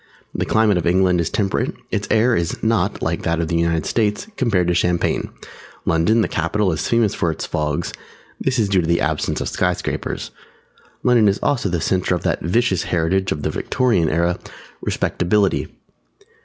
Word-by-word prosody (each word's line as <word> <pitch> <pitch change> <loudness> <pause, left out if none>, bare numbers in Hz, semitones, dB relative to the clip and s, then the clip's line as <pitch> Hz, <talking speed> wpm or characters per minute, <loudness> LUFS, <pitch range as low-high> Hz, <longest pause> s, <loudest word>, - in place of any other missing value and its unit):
The - - -2
climate 110 -4 +3
of 85 - -2
England 90 0 +3
is 85 - -1
temperate. 100 -2 -1 0.2
Its - - -1
air 115 +2 +3
is 85 -1 -2
not, 110 -3 0
like - - -1
that 85 0 0
of 80 -1 -1
the 85 - 0
United 85 -1 +1
States, 105 - 0
compared 100 - +1
to - - +2
champagne. 85 0 0 0.6
London, 105 +8 +3
the - - +1
capital, 90 +4 0
is 80 - -2
famous 115 -3 +2
for 85 - 0
its 80 - -3
fogs; 75 +2 -2 0.5
this 130 -1 0
is 110 -3 +2
due 95 -2 +2
to 80 - -3
the 85 0 +2
absence - - -1
of - - -2
Sky - - +1
Scrapers. - - -4 0.7
London 120 -4 +4
is 100 +1 +2
also 120 -8 +1
the 85 -1 -1
centre 90 +2 +1
of 85 - -5
that - - 0
vicious 95 +2 +1
heritage 90 +3 +1
of 75 - -3
the - - 0
Victorian 115 - +1
Era, 85 +2 0 0.4
Respectability. 100 +3 0
90 Hz, 180 wpm, -20 LUFS, 85-110 Hz, 0.7 s, London